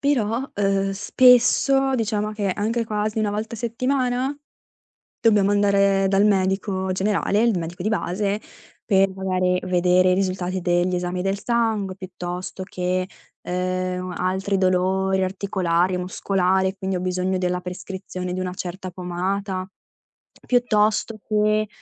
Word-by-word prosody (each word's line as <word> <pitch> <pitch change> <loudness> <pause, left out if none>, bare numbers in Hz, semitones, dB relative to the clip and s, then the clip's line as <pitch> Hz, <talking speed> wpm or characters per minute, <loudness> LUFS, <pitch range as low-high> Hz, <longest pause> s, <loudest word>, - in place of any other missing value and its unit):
Però, 245 -4 +1
uhm, 195 -1 +1
spesso, 250 +5 +4
diciamo, 215 -3 -1
che 205 -2 -1
anche 225 +4 -1
quasi 215 0 -2
una 210 -1 0
volta 215 +2 -4
a - - -8
settimana, 255 +3 -1 0.9
dobbiamo 205 -3 +4
andare 200 -1 +3
dal 195 +1 +3
medico 190 -1 +1
generale, 205 +3 +1
il 230 -5 +2
medico 170 +1 -5
di 215 - 0
base, 205 0 -1 0.4
per 195 -2 +4
magari 185 -1 0
vedere 180 0 +3
i - - +3
risultati 185 -1 -1
degli 175 +1 +1
esami 180 0 -2
del 195 +1 -1
sangue 220 -5 0
piuttosto 185 0 -6
che, 185 -1 -2 0.4
ehm, 185 0 -2
altri 190 +2 0
dolori 190 +1 +1
articolari 185 -2 0
e - - -1
muscolare, 190 +1 0
quindi 190 0 -2
ho 180 - -2
bisogno 185 +1 -1
della 180 0 -1
prescrizione 180 0 -6
di 185 - -3
una 185 -1 -3
certa 185 0 -6
pomata, 185 +2 -3 0.8
piuttosto 220 -2 +2
che, 215 0 +2
190 Hz, 130 wpm, -23 LUFS, 185-210 Hz, 0.9 s, spesso